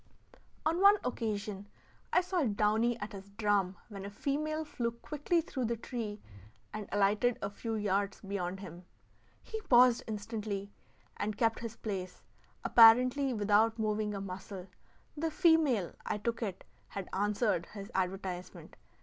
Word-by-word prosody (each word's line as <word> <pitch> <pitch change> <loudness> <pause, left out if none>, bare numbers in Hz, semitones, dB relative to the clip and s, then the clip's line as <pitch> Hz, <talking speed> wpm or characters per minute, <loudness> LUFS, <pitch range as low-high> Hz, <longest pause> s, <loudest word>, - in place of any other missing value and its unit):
On 330 +3 +1
one 400 +1 +8
occasion 210 -4 -3 0.4
I 360 - +5
saw 365 -1 -1
downy 220 +1 +2
at 205 0 -5
his 195 0 -9
drum 205 -3 +1
when 200 -3 -8
a 200 - -5
female 305 +8 -2
flew 240 -5 -2
quickly 300 +7 -1
through 265 -6 -3
the 230 +1 -1
tree 220 -3 -5 0.5
and 215 -2 -6
alighted 205 +4 +2
a 200 - -3
few 225 +2 -4
yards 200 -1 0
beyond 195 -2 -3
him. 175 -1 -10 0.6
He 440 0 -6
paused 250 - +6
instantly, 210 -2 -4 0.5
and 210 0 -2
kept 225 -1 +2
his 230 -1 -6
place, 185 -5 -5 0.4
apparently 250 +4 +6
without 215 0 +3
moving 215 -1 -1
a 195 - -4
muscle. 190 0 -7 0.5
The 325 +2 -1
female, 315 - +3
I - - -2
took 230 +3 -2
it, 195 -5 -4 0.2
had 195 -2 -6
answered 205 -2 +1
his 200 +1 -9
advertisement. 185 -1 -4
215 Hz, 140 wpm, -32 LUFS, 200-245 Hz, 0.6 s, one